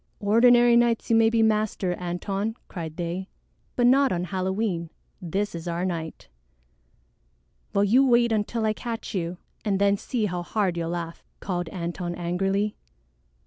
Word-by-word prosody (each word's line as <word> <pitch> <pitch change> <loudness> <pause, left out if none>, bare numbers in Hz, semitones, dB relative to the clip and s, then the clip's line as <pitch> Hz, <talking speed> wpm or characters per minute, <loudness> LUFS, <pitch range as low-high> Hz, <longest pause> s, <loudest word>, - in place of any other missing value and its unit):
"Ordinary 240 +3 +5
nights 235 -1 +2
you - - +5
may 225 0 +5
be 225 -1 +2
master, 215 -4 +1
Antone," 195 +5 -3
cried 160 -3 -7
they, 175 +2 -4 0.5
"but 245 - +2
not 270 +2 +5
on 175 -1 -1
Halloween. 185 -1 -2 0.3
This 195 +4 -2
is 170 0 -6
our 170 +1 -1
night." 165 -3 -5 1.4
"Well, 200 - +2
you 235 +7 +5
wait 235 -1 +4
until 220 +1 0
I 215 - +2
catch 230 +1 -6
you 175 -2 -2 0.3
and 200 -3 +1
then 200 0 +3
see 230 +1 -2
how 180 -3 -2
hard 190 0 -1
you'll 165 -1 -2
laugh," 170 -1 -5 0.2
called 175 -3 -3
Antone 175 0 -4
angrily. 195 +4 -1
195 Hz, 150 wpm, -25 LUFS, 175-225 Hz, 1.4 s, Ordinary